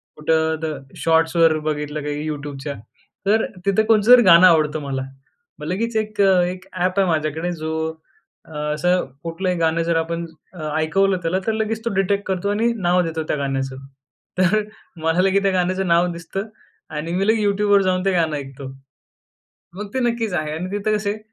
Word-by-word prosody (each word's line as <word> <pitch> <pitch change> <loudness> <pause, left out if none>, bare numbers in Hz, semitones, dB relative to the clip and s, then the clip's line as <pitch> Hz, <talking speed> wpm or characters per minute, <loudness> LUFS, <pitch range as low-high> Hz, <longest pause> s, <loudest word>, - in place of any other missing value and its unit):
कुठं 160 +1 +1
द - - -2 0.3
शॉट्सवर 165 0 +3
बघितलं 150 0 -2
काही 150 +1 -3
YouTubeच्या, 145 -1 -5 0.5
तर 220 +2 +3 0.2
तिथं 200 +2 +3
कोणचं 220 +1 +4
जर 250 - +10
गाणं 180 +1 +8
आवडतं 155 -2 +3
मला 135 -2 -3 0.6
मग - - -7
लगेच 225 +5 -2
1 215 -1 -1
अ, 190 -2 +5
1 180 +1 -4
ॲप 185 +2 0
आहे 190 - +3
माझ्याकडे 160 +2 -1
जो 160 -1 -4 1.0
असं 180 +4 +1 0.2
कुठलंही 180 +2 -2
गाणं 165 0 +1
जर 165 0 +1
आपण 170 0 -4 0.3
अ, 155 -3 -5
ऐकवलं 190 +4 +2
त्याला 180 +3 0
तर - - +3
लगेच 220 +1 -2
तो 230 - -1
डिटेक्ट 200 +1 0
करतो 190 +1 -1
आणि 225 +3 +1 0.2
नाव 180 +1 +4
देतो 160 -1 -3
त्या 150 - -2
गाण्याचं. 135 -1 -2 0.6
तर 210 +3 +3 0.4
मला 165 +3 +2
लगेच 195 +1 +2
त्या 195 - +2
गाण्याचं 185 +1 0
नाव 170 +1 +3
दिसतं 185 +5 -5 0.5
आणि 165 +3 -4
मी 195 +2 0
लगेच 220 -1 +2
YouTubeवर 205 0 +3
जाऊन 185 0 0
ते 195 - +3
गाणं 160 -3 +1
ऐकतो 135 -1 -8 1.1
मग 210 +1 -6
ते 260 - 0
नक्कीच 230 -4 -1
आहे. 155 -3 -2
आणि 180 +4 -5
तिथं 205 +1 0
कसं 205 -1 -2
आहे 215 - -6
180 Hz, 175 wpm, -21 LUFS, 160-200 Hz, 1.1 s, जर